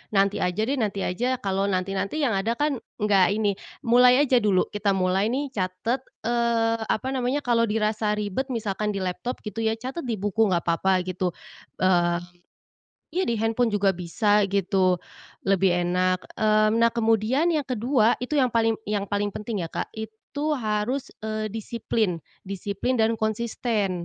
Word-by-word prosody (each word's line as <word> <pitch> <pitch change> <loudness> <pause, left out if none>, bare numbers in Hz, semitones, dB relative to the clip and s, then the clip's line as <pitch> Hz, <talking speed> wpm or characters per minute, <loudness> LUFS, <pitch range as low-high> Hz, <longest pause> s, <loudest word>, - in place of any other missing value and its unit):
"Nanti 200 +1 +3
aja 180 +4 0
deh, 265 +3 -1
nanti 200 -3 -1
aja," 245 +8 0
kalau 195 0 0
nanti-nanti 195 +9 -1
yang 245 - +2
ada 215 +4 0
kan 290 -3 0 0.2
enggak 200 -1 +4
ini. 210 -2 +1 0.3
Mulai 250 +3 +6
aja 255 -3 +4
dulu, 200 -4 +3
kita 205 -1 0
mulai 190 +2 +1
nih 270 +3 -2
catat, 190 +5 -2 0.2
eee, 230 -1 +1
apa 255 +4 -1
namanya, 260 +2 -1
kalau 230 -1 +2
dirasa 215 0 0
ribet 210 +6 -2
misalkan 210 -4 -2
di 190 - -2
laptop 185 +7 -4
gitu 210 0 -6
ya, 220 0 +1
catat 260 +5 -6
di 230 - 0
buku 210 +2 +1
enggak 175 -3 +1
apa-apa 185 +2 +1
gitu, 180 -1 -2 0.5
eee 175 -2 +3 1.0
iya, 375 - +2
di 235 - +1
handphone 225 +2 +1
juga 200 -1 +3
bisa 205 +4 +2
gitu, 185 -2 +2 0.5
lebih 195 -1 +3 0.2
enak, 185 +1 +1 0.2
eee. 215 0 +3
Nah, 230 0 +4
kemudian 225 - +2
yang 310 -4 +1
kedua 240 -2 +2
itu, 250 +5 -3
yang 255 -4 +3
paling 225 -1 +2
yang 205 -1 -2
paling 205 0 -1
penting 210 0 -4
ya, - - -3
Kak, - - -3
itu 220 +8 -4
harus, 230 +4 -2
eee, 215 -1 -3
disiplin. 220 -3 -1 0.3
Disiplin, 200 +6 -2
dan 225 0 +1
konsisten. 220 -2 -1
215 Hz, 160 wpm, -25 LUFS, 195-235 Hz, 1.0 s, Mulai